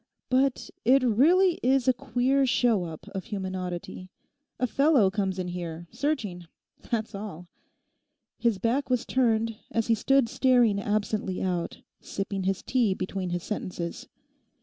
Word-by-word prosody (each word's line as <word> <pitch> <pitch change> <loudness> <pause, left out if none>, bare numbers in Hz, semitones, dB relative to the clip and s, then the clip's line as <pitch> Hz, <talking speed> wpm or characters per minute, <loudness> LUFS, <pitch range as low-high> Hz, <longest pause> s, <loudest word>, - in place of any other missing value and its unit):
'But 265 0 +1
it 260 +3 +5
really 330 - +4
is 260 0 +2
a 255 - +6
queer 255 +2 +1
show 235 -7 +2
up 160 -2 -9
of 190 -2 -6
human 190 -3 -4
oddity. 180 0 -5 0.5
A 250 - +2
fellow 275 -6 +3
comes 195 -2 -1
in 180 -1 -3
here, 170 -1 -5
searching; 220 - -2 0.4
that's 225 -2 -2
all.' 195 -4 -7 0.9
His 235 -4 +2
back 250 +7 0
was 250 -2 +1
turned, 225 -3 +1
as 225 -1 0
he - - +6
stood 270 +3 +3
staring 245 -4 +3
absently 205 -2 -1
out, 180 -2 -2 0.2
sipping 195 -1 -4
his 195 0 -1
tea 235 -7 +1
between 185 -1 -3
his 175 0 -3
sentences. 180 -5 -5
215 Hz, 145 wpm, -27 LUFS, 185-255 Hz, 0.9 s, a